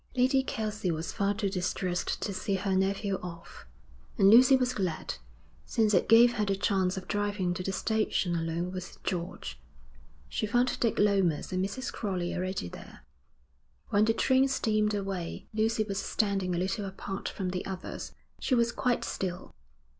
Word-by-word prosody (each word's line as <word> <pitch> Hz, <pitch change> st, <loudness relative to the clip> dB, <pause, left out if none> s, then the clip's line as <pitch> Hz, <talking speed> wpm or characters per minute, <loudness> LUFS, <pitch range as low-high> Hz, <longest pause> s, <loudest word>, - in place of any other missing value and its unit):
Lady 260 Hz, +2 st, +4 dB
Kelsey 215 Hz, -6 st, -3 dB
was 160 Hz, 0 st, -2 dB
far 200 Hz, 0 st, 0 dB
too 205 Hz, -1 st, -1 dB
distressed 180 Hz, -1 st, -1 dB
to 200 Hz, -, -2 dB
see 195 Hz, +1 st, -1 dB
her 190 Hz, 0 st, 0 dB
nephew 195 Hz, +1 st, 0 dB
off; 170 Hz, -, -9 dB, 0.5 s
and 195 Hz, 0 st, +6 dB
Lucy 250 Hz, +4 st, +8 dB
was 250 Hz, -1 st, 0 dB
glad, 185 Hz, -5 st, -2 dB, 0.5 s
since 220 Hz, -3 st, +1 dB
it 180 Hz, -, +3 dB
gave 235 Hz, +2 st, +7 dB
her 210 Hz, -, +1 dB
the 195 Hz, -1 st, +1 dB
chance 190 Hz, -2 st, +1 dB
of 185 Hz, -, -6 dB
driving 205 Hz, -3 st, 0 dB
to 180 Hz, -, -4 dB
the 195 Hz, -, -2 dB
station 215 Hz, -4 st, 0 dB
alone 165 Hz, +2 st, -2 dB
with 185 Hz, 0 st, -7 dB
George. 175 Hz, 0 st, -4 dB, 0.7 s
She 215 Hz, -, -2 dB
found 245 Hz, +3 st, +1 dB
Dick 230 Hz, -3 st, +1 dB
Lomas 195 Hz, -6 st, +2 dB
and 185 Hz, 0 st, +1 dB
Mrs. 225 Hz, +7 st, -4 dB
Crowley 185 Hz, -5 st, -2 dB
already 185 Hz, -, -2 dB
there. -, -, -11 dB, 0.9 s
When 205 Hz, +1 st, +4 dB
the 225 Hz, -, +3 dB
train 260 Hz, +2 st, +4 dB
steamed 215 Hz, -5 st, +1 dB
away, 195 Hz, -4 st, -4 dB
Lucy 220 Hz, 0 st, +1 dB
was 200 Hz, -1 st, -3 dB
standing 195 Hz, -5 st, 0 dB
a -, -, -1 dB
little 195 Hz, +4 st, -1 dB
apart 195 Hz, 0 st, -5 dB
from 190 Hz, -2 st, -3 dB
the 180 Hz, 0 st, -3 dB
others. 185 Hz, -1 st, -6 dB, 0.3 s
She 260 Hz, -, +1 dB
was 235 Hz, -1 st, +3 dB
quite 245 Hz, -1 st, 0 dB
still. 180 Hz, -1 st, -4 dB
195 Hz, 170 wpm, -29 LUFS, 185-220 Hz, 0.9 s, Lucy